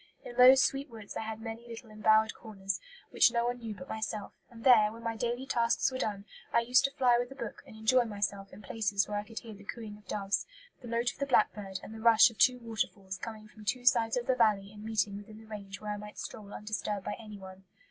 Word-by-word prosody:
In 240 - -8
those 255 +2 +8
sweet 275 +1 -1
woods 220 -3 -10
I - - -2
had 220 0 -5
many 225 +1 -7
little 230 -1 -9
embowered 215 +1 +3
corners, 195 -3 -4 0.3
which - - +5
no 235 0 +1
one 245 0 -1
knew 225 -3 -6
but 180 -1 -10
myself; 215 -2 -4 0.2
and 230 -1 -13
there, 220 -5 +6
when 230 +1 -11
my 230 -1 -2
daily 240 +3 -2
tasks 235 -1 +2
were 260 - -4
done, 205 -4 -2 0.3
I 235 - +4
used 250 +3 +4
to 275 - 0
fly 245 -2 +5
with 245 +1 -3
a - - -8
book 235 -5 -6
and - - -12
enjoy 235 +3 +3
myself 200 -2 -3
in 205 +3 -12
places 200 -2 0
where 205 0 -2
I - - -4
could 225 +1 -14
hear 225 -2 -9
the 205 0 -13
cooing 210 0 -7
of 210 - -24
doves, 200 -1 -1 0.3
the 245 - -9
note 235 +1 0
of - - -21
the 280 - -1
blackbird, 205 -6 +1
and 220 - -9
the 220 - -9
rush 230 +1 +7
of 220 - -18
two 250 -1 +5
waterfalls 205 -4 -4
coming 215 -2 -7
from 215 0 -15
two 245 +3 -2
sides 235 -2 +4
of 240 - -2
the 260 - +3
valley 210 -5 +2
and 210 0 -11
meeting 215 -2 0
within 210 +1 -11
the 220 - -13
range 200 -3 -8
where 210 0 -4
I 210 - -3
might 210 0 -10
stroll 205 -2 -7
undisturbed 210 -2 -3
by - - -2
anyone. 195 -3 -11
220 Hz, 250 wpm, -31 LUFS, 205-235 Hz, 0.3 s, those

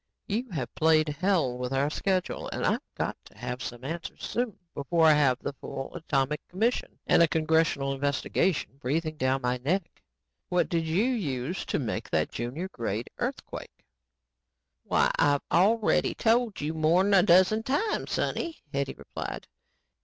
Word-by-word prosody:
"You 235 +5 -2
have 140 - -4
played 155 -1 +3
hell 155 -5 +1
with 125 0 -3
our 140 +2 +1
schedule 185 +2 -1
and - - -3
I've - - +1
got - - -2
to - - -18
have 125 +2 -4
the 120 -2 -6
answers 165 +3 -6
soon 235 -4 -2 0.2
before 160 +3 +2
I 155 - +8
have 140 -4 +3
the 140 - -5
full 135 0 -7
atomic 150 -3 -1
commission 225 +7 -1
and - - +5
a 170 - +7
congressional 160 -3 +1
investigation 140 +3 0
breathing 155 +4 -1
down 130 -1 0
my 125 0 +1
neck. 165 +8 -2 0.5
"What 180 0 +1
did 165 -1 0
you 170 +7 +2
use 175 - -2
to - - 0
make 120 -7 -3
that 80 -1 0
junior 125 +10 -4
grade 115 - -4
earthquake?" - - -5 1.0
"Why, - - +2
I've 145 -1 +3
already 210 +5 +3
told 230 -1 +2
you 150 +2 -2
more'n 170 +6 +3
a 195 - +7
dozen 185 +5 +5
times, 290 - -1
sonny," 335 -2 -1 0.2
Hetty 140 -1 -1
replied. - - -6
160 Hz, 155 wpm, -28 LUFS, 135-185 Hz, 1.0 s, I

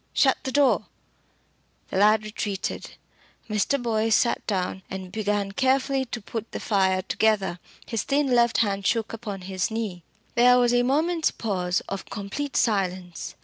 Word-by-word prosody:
Shut 265 -2 +3
the 265 - -4
door." 285 0 +3 1.0
The - - -3
lad 215 +2 +5
retreated. 210 -2 -4 0.5
Mr. 215 +6 +1
Boyce 225 -2 +1
sat 235 - +1
down 190 -2 -1
and 190 -1 -6
began 205 -1 -1
carefully 265 +3 +1
to 240 0 -5
put 225 +1 -6
the - - -3
fire 190 -3 +1
together. 200 -4 +1 0.3
His 225 -3 -2
thin 285 +1 +1
left 235 -1 +4
hand 200 -1 -1
shook 230 -1 0
upon 210 -4 -6
his 185 0 -2
knee. 220 -6 -4 0.3
There 250 0 +6
was 245 -1 +3
a 245 - +4
moment's 315 +6 +2
pause 185 -4 -1
of 195 -1 -6
complete 240 +8 -4
silence. 185 -5 -1
215 Hz, 150 wpm, -25 LUFS, 195-245 Hz, 1.0 s, There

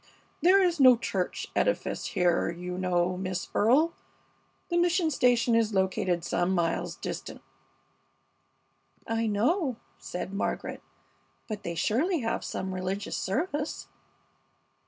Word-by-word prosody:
There 380 +3 +6
is 350 -3 +1
no 255 -3 +8
church 190 -5 -2
edifice - - 0
here, 175 -1 +1
you 180 +1 -5
know, 180 -1 +1
Miss 185 -1 -3
Earle. 280 +10 +4 0.8
The 345 - +1
mission 345 -1 +2
station 245 -3 +3
is 225 -2 +2
located 185 -2 +1
some 175 +2 0
miles 170 -1 -1
distant." - - -6 1.7
"I 225 0 -1
know," 255 - +1 0.2
said 180 +2 -5
Margaret, 200 - -3 0.7
"but 215 -2 -5
they 170 - -4
surely 280 - +1
have 225 - -2
some 190 0 -4
religious 185 +2 -3
service?" 300 - -2
215 Hz, 115 wpm, -28 LUFS, 185-295 Hz, 1.7 s, no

